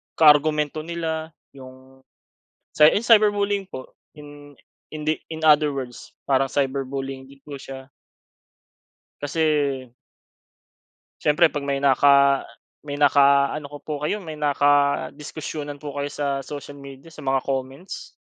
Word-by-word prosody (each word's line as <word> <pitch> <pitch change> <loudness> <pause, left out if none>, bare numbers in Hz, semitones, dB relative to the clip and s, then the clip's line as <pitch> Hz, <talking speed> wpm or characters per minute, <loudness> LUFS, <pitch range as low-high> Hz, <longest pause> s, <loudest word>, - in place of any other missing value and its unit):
kaargumento 150 0 +4
nila 160 0 -5 0.2
yung 130 0 -15 0.7
cy 150 - +6
ah, 210 - 0
cyberbullying 205 -3 +3
po. 130 -8 -9 0.2
Hin 145 -1 -13 0.3
hindi 155 0 -2
in 160 0 -7
other 150 -2 +4
words 125 -3 -8
parang 135 0 +1
cyberbullying 135 0 -3
din 135 0 -19
po 145 -2 -9
siya. 135 0 -10 1.3
Kasi 145 +3 -3 1.8
siyempre 160 +3 +4
'pag 145 -2 -5
may 140 -1 -1
naka 140 0 +4 0.4
may 145 - -4
naka-ano 140 0 +3
ko 145 +1 -10
po 155 - -6
kayo, 205 +7 -2
may 155 -3 -8
nakadiskusyunan 145 +1 -1
po 145 - -5
kayo 140 0 -2
sa 140 -2 -2
social 145 -1 -9
media, 140 +3 -12
sa 160 - -18
mga 135 -1 +1
comments 135 +6 -5
145 Hz, 120 wpm, -23 LUFS, 135-155 Hz, 1.8 s, cy